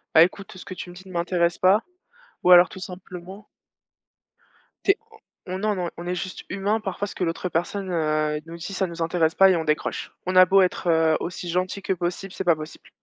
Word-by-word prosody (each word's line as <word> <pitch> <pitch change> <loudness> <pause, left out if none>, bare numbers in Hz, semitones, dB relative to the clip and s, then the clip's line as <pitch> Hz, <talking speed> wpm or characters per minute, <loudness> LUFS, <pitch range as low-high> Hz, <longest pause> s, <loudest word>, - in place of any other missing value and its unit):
«Bah, 160 - +10
écoute 195 +2 -3
ce - - -11
que 185 - -7
tu 180 - -8
me 175 - -11
dis 185 +1 -13
ne 185 - -11
m'intéresse 170 0 +1
pas», 195 +4 +4 0.6
ou 180 - +3
alors 175 -1 +9
tout 190 - -10
simplement 185 +2 -9 1.4
tu - - +6
es, 390 - -1 0.5
on 185 - -4
on 185 - -3
non, 210 +1 0
non 180 -2 -2
on 170 - -7
est 180 - -1
juste 185 +1 -5
humain 200 +3 0
parfois 200 0 -3
ce - - -9
que - - -2
l'autre 170 +1 -2
personne, 185 +4 -2
heu, 155 -2 0
nous 165 +1 -9
dit, 170 +4 -7
ça 190 0 0
nous 170 -1 -7
intéresse 165 -1 +1
pas 195 0 +7
et 185 - +4
on 165 - -1
décroche. 150 -1 -2
On 185 +1 -2
a 185 0 +9
beau 195 +2 +5
être, 180 -1 0
heu, 160 -1 +4
aussi 175 0 -5
gentil 185 +3 -1
que 190 - 0
possible, 180 +2 -4
c'est - - -4
pas 175 -3 +4
possible. 155 0 -10
180 Hz, 235 wpm, -24 LUFS, 170-190 Hz, 1.4 s, Bah